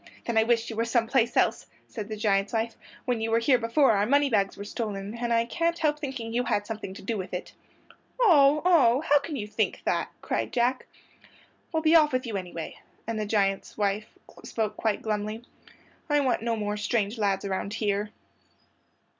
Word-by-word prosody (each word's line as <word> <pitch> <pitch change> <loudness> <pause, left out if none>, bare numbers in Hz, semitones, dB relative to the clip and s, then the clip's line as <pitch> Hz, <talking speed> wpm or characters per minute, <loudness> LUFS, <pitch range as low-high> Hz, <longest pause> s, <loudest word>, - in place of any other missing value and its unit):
"Then 235 - -2
I 220 - +6
wish 230 0 +1
you - - -6
were 225 - +1
some 230 0 +1
place 240 0 +1
else," - - +2 0.2
said 215 -4 -6
the 215 -1 -5
giant's 200 -1 +1
wife; 225 0 -1 0.3
"when 245 -3 0
you 225 - -1
were 225 - +3
here 250 +2 +3
before 235 +4 +3
our 205 -1 +2
moneybags 250 -8 +2
were 200 - -6
stolen, 205 -1 -4
and 240 0 -2
I 230 0 +3
can't 335 +7 -1
help 300 -2 0
thinking 260 -6 -5
you 245 +1 0
had 205 - 0
something 210 -3 -6
to - - -10
do 215 +1 -2
with 185 -1 -5
it." 180 - -6 0.7
"Oh, 305 - +5
oh! 275 -8 +5
How 290 -2 +4
can 290 +2 -6
you 215 -6 -3
think 210 - -2
that?" - - 0
cried - - -2
Jack. 250 +1 +1 0.8
"Well, 320 -2 -1
be 315 0 +4
off 305 -4 +5
with 255 0 0
you, 225 -3 -4
anyway"; 180 -4 -6 0.3
and 225 -1 -3
the 210 - -2
giant's 195 -2 0
wife 210 +1 0 0.4
spoke 220 -2 -2
quite 220 -2 -1
glumly. 215 +1 -3 0.7
"I 295 0 +3
want 260 -5 +1
no 230 0 0
more 210 -1 -2
strange 215 +1 -1
lads 200 -2 0
around 195 +2 -3
here." 205 -1 -1
225 Hz, 195 wpm, -27 LUFS, 205-255 Hz, 0.8 s, I